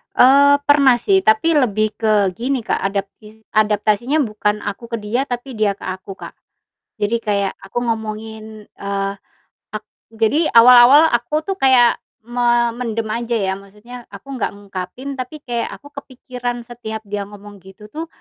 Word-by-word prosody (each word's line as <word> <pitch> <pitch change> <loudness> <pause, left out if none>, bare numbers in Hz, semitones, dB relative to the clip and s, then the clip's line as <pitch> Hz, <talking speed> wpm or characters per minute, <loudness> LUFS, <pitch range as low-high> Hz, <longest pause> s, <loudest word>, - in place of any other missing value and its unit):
Eee, 280 +2 +6
pernah 285 -3 +5
sih, 385 +10 +2
tapi 220 +3 +2
lebih 215 -5 +1
ke 210 -4 +2
gini, 255 +1 -2
Kak, - - -1
adaptis 205 +2 -5
adaptasinya 215 +5 +1
bukan 210 -2 -2
aku 205 +3 -6
ke - - -4
dia, 240 +7 -2
tapi 245 +2 -5
dia 210 -2 +1
ke - - -16
aku, 190 +1 -6
Kak. - - -10 0.7
Jadi 215 +3 0
kayak 200 -2 -1
aku 195 +4 -8
ngomongin, 220 -1 -6
eee, 200 0 -4 0.6
ak 215 0 -5 0.3
jadi 225 +9 +1
awal-awal 250 +6 +8
aku 240 +6 0
tuh 390 - -2
kayak 255 -3 +4 0.3
memendam 240 -1 0
aja 235 +1 -2
ya, 195 -3 -1
maksudnya 210 +5 -13
aku 240 +8 -11
enggak 255 -6 -2
ngungkapin, 200 +7 -7
tapi 270 +3 -7
kayak 240 -2 -3
aku 285 0 -17
kepikiran 250 -3 -6
setiap 225 -2 -8
dia 205 -1 -5
ngomong 205 0 -13
gitu 190 +2 -15
tuh, 320 +2 -5
230 Hz, 150 wpm, -19 LUFS, 210-250 Hz, 0.7 s, awal-awal